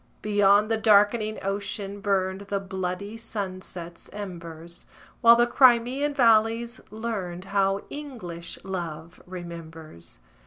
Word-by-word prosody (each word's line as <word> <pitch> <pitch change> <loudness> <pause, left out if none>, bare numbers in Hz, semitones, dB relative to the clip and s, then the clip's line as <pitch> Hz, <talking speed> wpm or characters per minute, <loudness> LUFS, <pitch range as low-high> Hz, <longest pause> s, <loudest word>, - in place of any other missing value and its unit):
Beyond 205 +1 +4
the 225 - +2
darkening 215 0 +4
ocean 200 0 -3
burned 190 -2 0
The 200 0 -1
bloody 190 +2 -4
sunset's 185 -5 -6
embers, 170 -4 -8 0.3
While 235 0 +8
the 240 0 +4
Crimean 255 +3 +4
valleys 230 -1 +3
learned 200 -5 -4
How 195 0 +1
English 180 - -7
love 170 -4 -6
remembers. 165 - -9
200 Hz, 105 wpm, -26 LUFS, 180-225 Hz, 0.3 s, While